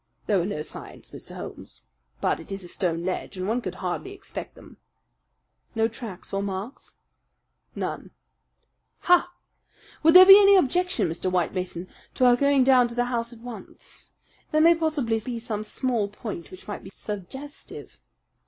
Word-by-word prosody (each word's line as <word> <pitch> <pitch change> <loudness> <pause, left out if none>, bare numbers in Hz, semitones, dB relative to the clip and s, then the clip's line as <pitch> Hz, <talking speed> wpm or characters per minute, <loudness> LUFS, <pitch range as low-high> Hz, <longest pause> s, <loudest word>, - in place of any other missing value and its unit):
"There 200 -3 +2
were 175 - -1
no 150 -7 -3
signs, 155 - -11
Mr. - - -11
Holmes. - - -10 0.4
But - - +1
it 165 - -12
is 195 -1 -5
a - - -8
stone 170 -2 -2
ledge, 185 +1 -4
and 185 +1 -3
one 235 +4 0
could 185 -4 -5
hardly 185 - -4
expect 400 - -8
them." - - -16 1.0
"No 225 0 +2
tracks 225 -6 -9
or 195 - 0
marks?" 200 +6 -6 0.8
"None." - - -4 0.9
"Ha! 355 0 +4 0.7
Would 325 +2 +5
there 370 0 +12
be 390 +1 +11
any 400 -1 +7
objection, 360 - +2
Mr. 170 +3 -3
White 180 -2 0
Mason, 185 -1 -4 0.3
to 255 - +3
our 245 -1 +6
going 280 +1 +3
down 255 -2 +5
to 235 - -9
the 245 0 +1
house 235 0 -2
at 230 -1 -13
once? 245 -1 -11 0.4
There 310 - +2
may 335 +2 +7
possibly 300 -9 0
be 235 +2 -5
some 220 -2 -4
small 230 -1 -1
point 205 -5 -7
which 185 - -13
might 205 - -6
be - - -10
suggestive." 220 - -9
230 Hz, 170 wpm, -25 LUFS, 190-280 Hz, 1.0 s, there